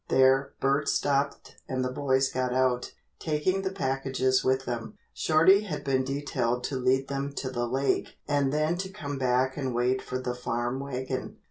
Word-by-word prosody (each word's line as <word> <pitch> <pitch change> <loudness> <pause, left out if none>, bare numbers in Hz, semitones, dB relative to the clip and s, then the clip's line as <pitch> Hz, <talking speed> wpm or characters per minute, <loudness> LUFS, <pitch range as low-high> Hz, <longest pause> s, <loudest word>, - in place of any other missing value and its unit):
There 130 +1 +4
Bert 140 +2 +1
stopped 140 0 0
and 130 -1 -1
the 125 - -2
boys 135 0 +1
got 130 -1 -1
out, 130 -1 +1 0.3
taking 165 +5 0
the 190 0 -2
packages 135 -6 0
with 130 0 +1
them. 115 -2 -5 0.2
Shorty 165 +6 +5
had 185 -8 -5
been 135 -2 +1
detailed 130 -3 -1
to 140 - -2
lead 130 +1 +2
them 140 0 -3
to 130 -2 -4
the 120 -1 -1
lake 135 +3 0
and 145 -2 +2
then 155 +3 +1
to 190 0 -3
come 145 -8 -5
back 130 +1 +1
and 130 -4 -2
wait 125 +2 +1
for 130 - -4
the 130 -1 -3
farm 120 +1 -2
wagon. 130 -1 -4
135 Hz, 175 wpm, -28 LUFS, 130-145 Hz, 0.3 s, Shorty